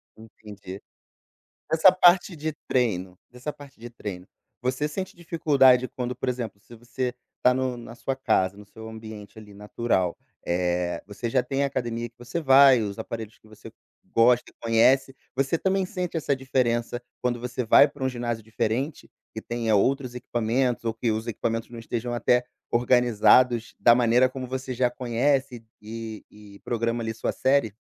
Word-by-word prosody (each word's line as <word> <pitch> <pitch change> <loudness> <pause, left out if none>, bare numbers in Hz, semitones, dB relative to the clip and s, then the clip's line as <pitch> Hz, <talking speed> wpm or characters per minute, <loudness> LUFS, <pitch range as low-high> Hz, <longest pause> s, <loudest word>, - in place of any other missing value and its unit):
Entendi. 105 -3 -11 0.9
Essa 165 +3 +7
parte 180 0 +4
de 155 0 -3
treino, 95 -7 0
dessa 125 +5 -6
parte 140 -4 -15
de 120 +1 -9
treino, 100 -6 -7 0.4
você 130 +4 -1
sente 185 +5 -5
dificuldade 140 -7 +3
quando, 125 -1 -3
por 130 - -2
exemplo, 120 -5 -4
se 120 - -14
você 120 +2 -4 0.3
tá 125 - +6
no 130 -1 -1
na 115 0 -10
sua 135 +2 -3
casa, 100 -7 +1
no 105 - -12
seu 110 +2 -11
ambiente, 110 -1 -10
ali, 105 -2 -12
natural, 105 -3 -1 0.3
eh, 90 0 -1
você 105 +3 -5
já 130 +1 +2
tem 135 +2 -1
a - - +2
academia 120 -3 -3
que 115 - -45
você 120 +7 -4
vai, 135 -3 +7
os 100 -1 -4
aparelhos 110 -1 -7
que 110 - -23
você 110 0 -13 0.4
gosta 120 +1 +4
e - - -24
conhece, 125 +4 +3 0.2
você 135 +5 +1
também 190 +1 0
sente 180 -3 -4
essa 145 -3 0
diferença, 120 -2 -1 0.2
quando 120 -1 -1
você 125 +1 -3
vai 140 +6 +7
pra 140 -1 -9
um 130 - +1
ginásio 120 -3 -4
diferente, 115 +6 -3 0.3
que 110 - -5
tenha 115 -2 0
outros 125 +3 +1
equipamentos 120 +1 -1
ou 115 - 0
que 115 0 -1
os 110 +1 -3
equipamentos 115 +1 -3
não 120 - -10
estejam 120 +1 -4
até 125 +1 +2 0.3
organizados 120 0 +3
da 120 - +6
maneira 120 +1 +4
como 130 -1 -6
você 130 0 -4
já 125 0 +1
conhece 125 0 -1 0.2
e 110 0 -7
e 105 -1 -15
programa, 115 0 -2
ali, 110 0 -3
sua - - -2
série? 130 -5 +1
120 Hz, 170 wpm, -25 LUFS, 110-130 Hz, 0.9 s, Essa